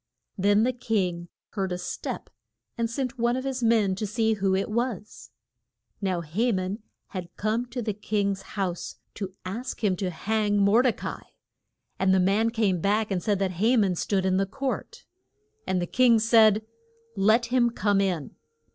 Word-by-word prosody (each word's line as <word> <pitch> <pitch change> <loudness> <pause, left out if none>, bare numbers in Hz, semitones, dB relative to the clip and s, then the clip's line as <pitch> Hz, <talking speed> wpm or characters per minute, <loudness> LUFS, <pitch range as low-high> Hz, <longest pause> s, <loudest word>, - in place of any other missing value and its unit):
Then 205 +2 +3
the 255 +2 +1
king 185 -8 -1 0.2
heard 195 -3 -3
a 180 - -1
step - - -5 0.4
and 230 -1 -1
sent 250 +1 -3
one 240 +1 +2
of 260 - -3
his 265 -2 -3
men 225 -4 +3
to 215 - -2
see 220 +1 +1
who 195 -2 +1
it 195 - 0
was. 225 -2 -3 0.7
Now 185 -3 0
Ha 200 +10 0
man 190 +1 -2 0.3
had 180 -3 -6
come 220 +4 -1
to 245 0 -5
the 215 -1 -1
king's 200 -1 -1 0.2
house 180 -3 -2 0.2
to 195 -3 -5
ask 235 +6 -5
him 195 -3 +3
to 190 -1 -1
hang 205 +4 0
Mor 200 +4 +5
de 255 -1 +3
ca - - -6
i. - - -30 0.7
And 190 0 +3
the - - +4
man 200 +5 +3
came 215 -6 +1
back 210 +2 +1
and 185 -2 0
said 205 0 +1
that 185 -2 -2
Ha 240 +4 +4
man 200 -4 +3
stood 190 +2 -1
in 185 0 +2
the 195 0 +1
court. 275 - -4 0.6
And 185 - +1
the 175 - -1
king 245 +4 +4
said, 220 -1 +5 0.5
Let 225 +5 +3
him 240 -2 +4
come 205 -3 +1
in. 180 -7 -2
210 Hz, 180 wpm, -26 LUFS, 190-230 Hz, 0.7 s, Mor